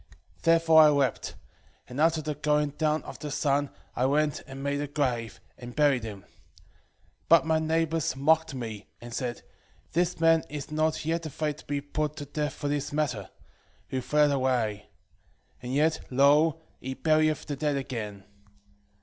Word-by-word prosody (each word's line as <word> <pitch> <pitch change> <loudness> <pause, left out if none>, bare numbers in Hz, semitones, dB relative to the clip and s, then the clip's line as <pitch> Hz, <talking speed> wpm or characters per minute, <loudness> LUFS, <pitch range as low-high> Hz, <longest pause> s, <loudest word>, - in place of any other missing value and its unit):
2:7 - - -26
Therefore 165 -1 +6
I 155 - +8
wept: 140 -5 0 0.5
and 125 +4 -4
after 160 -1 +3
the 150 0 -2
going 150 0 +1
down 155 +1 0
of - - -9
the 150 - -5
sun 145 -1 0 0.3
I 125 - +2
went 150 +1 +1
and 135 0 -8
made 140 0 -1
a 145 - -3
grave, 125 -6 -2 0.2
and 120 0 -9
buried 145 -5 +3
him. 105 -3 -7
2:8 - - -24 1.0
But 165 0 +6
my 160 -1 +2
neighbours 160 -1 0
mocked 160 +2 +2
me, 110 -5 -6
and 120 0 -10
said, 120 -1 -4 0.5
This 175 +1 0
man 165 -1 +4
is 150 0 -6
not 155 0 0
yet 165 0 -1
afraid 150 0 -3
to - - -15
be 145 0 -2
put 150 +1 -3
to 145 -1 -6
death 150 0 -3
for 145 - -4
this 145 0 -2
matter: 145 -9 -2 0.6
who 130 - -2
fled 150 +3 +3
away; 120 -6 0 0.7
and 125 0 -6
yet, 155 +4 +2
lo, 145 +4 +4 0.2
he 130 +1 -5
burieth 155 0 +2
the 145 - -4
dead 150 +1 0
again. 110 -7 -5
145 Hz, 170 wpm, -28 LUFS, 130-155 Hz, 1.0 s, I